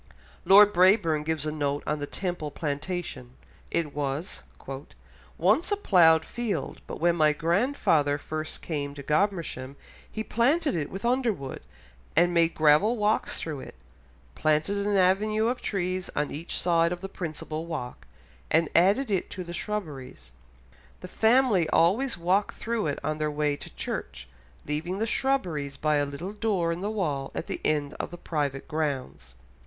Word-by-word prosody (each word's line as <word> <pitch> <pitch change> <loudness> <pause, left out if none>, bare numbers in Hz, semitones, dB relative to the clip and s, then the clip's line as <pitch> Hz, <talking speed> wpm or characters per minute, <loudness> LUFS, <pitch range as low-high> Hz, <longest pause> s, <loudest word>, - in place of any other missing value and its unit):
Lord 205 +1 +8
Brabourne 180 -4 +4
gives 155 -1 -2
a 155 - -1
note 145 -1 -2
on 150 +1 -1
the 145 - -4
Temple 175 -4 -3
Plantation, 145 -3 -4 0.3
it 160 -4 -1
was 145 +4 -3 1.0
"once 210 - +2
a 410 - +2
ploughed 165 - +5
field, 240 -4 -3
but - - -6
when 170 +1 +3
my 155 -2 +4
grandfather 165 - +2
first 155 +1 -5
came 145 -3 -3
to 140 - -8
Godmersham, 155 -5 -1 0.4
he 220 - -3
planted 280 +9 +2
it 155 -4 -2
with 195 +4 -6
underwood, 235 - -1 0.5
and 175 +2 +4
made 165 -1 +3
gravel 155 +10 +4
walks 210 0 0
through 155 -4 -4
it, - - -10 0.6
planted 155 +7 +1
an 205 -1 +2
avenue 210 +4 +3
of 245 0 -3
trees 185 -2 -2
on 145 0 -1
each 160 +4 -4
side 170 -1 +2
of 175 0 -4
the 195 - -4
principal 160 -3 -5
walk, 135 -7 -6 0.4
and 160 0 +3
added 200 +9 +3
it 190 - 0
to 185 - -6
the 175 0 -8
shrubberies. 145 - -5 0.7
The - - -7
family 220 -7 +3
always 220 +11 +2
walked 185 +4 +1
through 230 -6 -2
it 145 - -1
on 155 0 -2
their 155 0 0
way 150 -1 0
to - - -12
church, 70 - -5 0.4
leaving 160 +6 -3
the 220 - 0
shrubberies 175 - -1
by 150 +1 +2
a 145 0 +1
little 160 +8 -6
door 205 -6 0
in 170 +2 -4
the 205 - -1
wall 150 -11 -2
at - - -3
the - - -5
end 150 -1 0
of - - -3
the 175 - -9
private 145 -5 -3
grounds." 135 - -3
170 Hz, 160 wpm, -27 LUFS, 150-200 Hz, 1.0 s, Lord